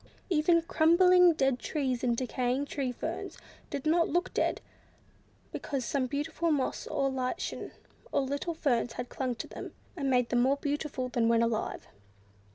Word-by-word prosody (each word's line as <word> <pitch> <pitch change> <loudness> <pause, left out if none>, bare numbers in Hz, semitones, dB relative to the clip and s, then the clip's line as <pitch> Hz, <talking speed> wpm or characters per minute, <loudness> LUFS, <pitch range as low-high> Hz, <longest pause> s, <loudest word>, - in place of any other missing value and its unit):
Even 335 +1 +4
crumbling 350 +2 +5
dead 270 -4 +1
trees, 260 -5 -2
and 240 -2 +1
decaying 255 +2 -1
tree 275 -3 -2
ferns, 245 - -5 0.3
did 280 0 -4
not 335 +2 +3
look 350 +1 0
dead, - - +1 0.9
because 270 -4 -3
some 265 -1 0
beautiful 310 +5 -2
moss, 290 -4 -1
or 275 -1 0
lichen, 265 +6 -3 0.4
or - - +2
little 285 +5 -2
ferns 245 -6 0
had 245 - -5
clung 255 -2 -2
to - - -5
them, - - -8 0.2
and 280 -5 -1
made 250 -2 +2
them 240 -1 +2
more 270 +3 +3
beautiful 285 -2 -2
than 235 -2 +1
when 230 0 +4
alive. 230 -2 -2
275 Hz, 160 wpm, -30 LUFS, 250-315 Hz, 0.9 s, crumbling